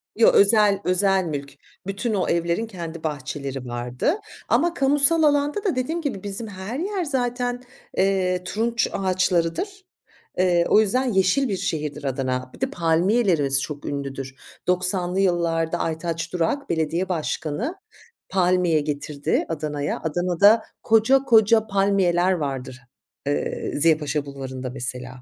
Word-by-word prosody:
Yo, 225 - +6
özel 205 -1 +5
özel 190 +1 +2
mülk. 140 -3 -5 0.3
Bütün 200 +4 -2
o 195 -3 0
evlerin 170 +6 0
kendi 170 -5 -7
bahçeleri 140 -3 -4
vardı 120 - -1 0.4
ama 330 +8 +2
kamusal 290 +3 +4
alanda 290 +6 +2
da 380 -9 0
dediğim 315 +7 -2
gibi, 255 -11 -4
bizim 205 +3 -4
her 200 +6 -6
yer 385 +1 -2
zaten, 245 -3 -2 0.4
eee, 185 -2 +1
turunç 230 +5 0
ağaçlarıdır. 185 - -1 0.5
Eee, 175 -2 +3
o - - +6
yüzden 250 +4 +1
yeşil 190 +8 +2
bir 195 - -1
şehirdir 150 -4 -3
Adana. 130 -1 -2
Bir - - -19
de 265 - 0
palmiyelerimiz 165 - +2
çok 145 -1 -6
ünlüdür. 135 -2 -5 0.3
90'lı 180 0 +1
yıllarda 170 -3 +1
Aytaç 165 +1 -3
Durak, 180 - -1
belediye 165 +3 -1
başkanı, 165 - -2 0.5
palmiye 180 -3 +2
getirdi 145 0 -2
Adana'ya. 150 -2 -3
Adana'da 180 +7 +3 0.2
koca 225 +5 +4
koca 220 -2 +4
palmiyeler 195 -3 +2
vardır, 135 -6 -3 0.5
ııı, 145 - -2
Ziya 160 0 +5
Paşa 150 -1 -2
Bulvarı'nda 130 -2 -6
mesela. 125 0 -5
180 Hz, 130 wpm, -23 LUFS, 150-220 Hz, 0.5 s, Yo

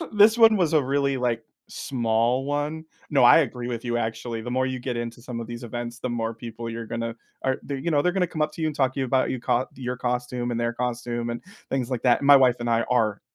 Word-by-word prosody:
This 215 +2 +6
one 225 -2 +7
was 170 -5 +1
a 155 -2 +4
really, 140 +1 +1
like, 120 -3 -1 0.3
small 120 +1 0
one 145 +2 -2 0.3
no, 140 -4 +3
I 120 - +8
agree 125 -6 -1
with 120 -1 -4
you, 120 -1 -1
actually. 115 0 -3
The 120 +2 -6
more 130 +1 +1
you 130 -1 -3
get 125 0 -4
into 120 0 -5
some 120 -1 -6
of 115 - -7
these 120 +1 -7
events, 120 0 -5
the 125 - -3
more 115 -1 -2
people 115 0 -7
you're 115 0 -6
gonna 115 0 -3 0.3
or 130 -1 +1
they're, 140 - -4
you 170 +5 -2
know, 145 -2 +3
they're 180 - +2
gonna 185 -1 +1
come 155 -2 -3
up 150 - 0
to - - -9
you 160 - +1
and 155 - -4
talk 130 -2 +1
to 135 - -1
about 130 0 +1
you 130 - -3
co 125 +1 +1
your 125 -1 -4
costume, 125 0 -2
and 115 - -2
their 120 0 0
costume, 120 -1 -3
and 120 - -5 0.3
things, 130 -2 -1
like, 125 -3 -2
that. 125 +1 +3
My 140 0 +8
wife 130 -3 +4
and 120 0 -1
I 115 0 +3
are 115 -5 +1
125 Hz, 260 wpm, -25 LUFS, 120-135 Hz, 0.3 s, I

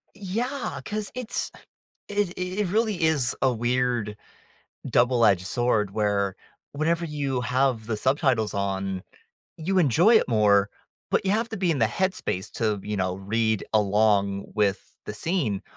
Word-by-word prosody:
Yeah. 240 +8 -3
'Cause 210 -1 -4
it's 250 -2 -3 0.6
it 205 -2 0
i - - -4
it 185 +2 -1
really 215 -4 0
is 145 -7 +2
a 130 - +4
weird 120 -2 0 0.7
double-edge 120 -7 +3
sword 110 -2 +1
where 100 -2 0 0.4
whenever 165 +3 0
you 140 -4 -2
have 125 -2 0
the 110 -2 -2
subtitles 130 -4 +1
on, 95 -1 -2 0.6
you 185 +4 0
enjoy 175 - +5
it - - +2
more, 100 -3 +3 0.4
but - - +1
you 190 - +3
have 230 +2 0
to 220 - -4
be 180 -3 +1
in 145 - 0
the 115 - +5
headspace 150 - -2
to, 110 -3 0
you 105 -1 -2
know, 95 -1 -1
read 110 +2 0
along 100 -1 +2
with 100 -3 0
the 105 - -5
scene. 130 - -1
120 Hz, 150 wpm, -25 LUFS, 105-175 Hz, 0.7 s, enjoy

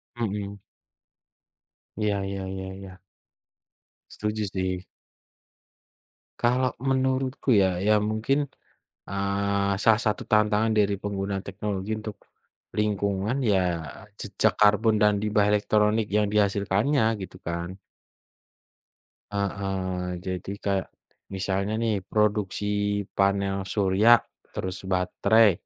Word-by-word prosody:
Mhm. 100 -3 -3 1.4
Iya 105 -1 0
iya 100 0 -4
iya 95 0 -5
iya. 95 -1 -11 1.1
Setuju 105 0 -2
sih. 95 -1 -2 1.6
Kalau 125 +1 +2 0.2
menurutku 130 0 0
ya, 95 -1 +1
ya 105 +1 +4
mungkin, 110 +7 0 0.7
eee, 100 0 0
salah 110 0 +5
satu 105 - 0
tantangan 105 +1 +3
dari 105 -2 +2
penggunaan 100 -1 -3
teknologi 100 0 -4
untuk 110 -1 -6 0.6
lingkungan 105 +4 0
ya 100 -4 +3 0.6
jejak - - +1
karbon 105 +1 +5
dan 105 -1 +4
limbah 105 -1 +2
elektronik 105 +1 +2
yang 105 +1 +1
dihasilkannya 105 +6 +2 0.2
gitu 95 -2 -8
kan. 85 +2 -4 1.6
Heeh, 95 -2 -2
jadi 95 +1 -4
kayak, 100 -1 0 0.5
misalnya 100 +2 -1
nih 115 -2 +1 0.2
produksi 105 -2 +1 0.5
panel 100 0 +2 0.2
surya, 100 +2 +3 0.5
terus 95 0 -3
baterai, 100 +4 +4
100 Hz, 95 wpm, -26 LUFS, 95-105 Hz, 1.6 s, salah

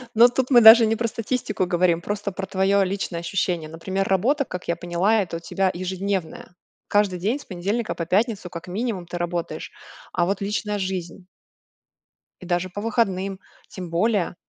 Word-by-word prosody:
Ну, 240 +2 +8
тут 260 +1 -1
мы 240 -3 +7
даже 225 +1 +10
не 220 +1 +1
про 230 +1 -1
статистику 220 -3 -2
говорим, 175 -1 +2
просто 205 +1 -3
про 195 +1 -5
твоё 195 +1 +2
личное 190 -2 -3
ощущение. 170 -2 -2
Например, 190 +4 -3
работа, 250 - +2
как 180 - -7
я 170 - 0
поняла- 175 +6 +1
это 170 -3 -4
у - - -8
тебя 190 +2 0
ежедневная, 185 -1 -4 0.3
каждый 205 -3 +1
день 225 +10 0
с - - -13
понедельника 200 +5 -2
по 170 - -3
пятницу, 200 0 0
как 170 +1 -8
минимум 200 -1 -3
ты 175 - -5
работаешь. 175 -1 -4 0.4
А 175 -1 +2
вот 195 +2 -2
личная 210 0 -2
жизнь? 185 -1 -4 1.1
И 180 - -10
даже 175 +1 0
по 205 - -6
выходным, 195 -4 -1 0.3
тем 180 -3 -8
более. 190 0 +1
190 Hz, 175 wpm, -23 LUFS, 175-210 Hz, 1.1 s, даже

